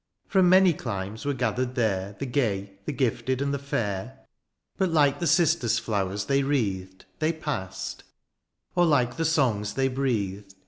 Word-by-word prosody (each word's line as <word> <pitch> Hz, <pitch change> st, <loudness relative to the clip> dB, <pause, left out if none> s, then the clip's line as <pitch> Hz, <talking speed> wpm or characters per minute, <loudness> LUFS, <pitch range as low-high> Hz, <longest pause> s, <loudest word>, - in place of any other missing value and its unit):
From 190 Hz, -3 st, +4 dB
many 185 Hz, -1 st, +6 dB
climes 105 Hz, -3 st, -5 dB
were 145 Hz, -1 st, 0 dB
gathered 125 Hz, +1 st, -1 dB
there, 100 Hz, -5 st, 0 dB
The 140 Hz, -, -4 dB
gay, 105 Hz, -7 st, -1 dB
the -, -, -2 dB
gifted, 130 Hz, -1 st, 0 dB
and 140 Hz, 0 st, -1 dB
the 140 Hz, -, -1 dB
fair; 115 Hz, -2 st, -3 dB, 0.6 s
But 190 Hz, -2 st, +2 dB
like 145 Hz, -3 st, +3 dB
the 170 Hz, -, 0 dB
cistus 160 Hz, -, +3 dB
flowers 100 Hz, -3 st, -2 dB
they 140 Hz, +4 st, +2 dB
wreathed. 100 Hz, -9 st, -2 dB
They 155 Hz, +1 st, +2 dB
past; 150 Hz, -, -5 dB, 0.7 s
or 175 Hz, -1 st, +4 dB
like 130 Hz, -5 st, +2 dB
the 165 Hz, -, 0 dB
songs 120 Hz, -10 st, +1 dB
they 135 Hz, 0 st, +2 dB
breathed. 105 Hz, -7 st, -2 dB
130 Hz, 155 wpm, -26 LUFS, 100-145 Hz, 0.7 s, many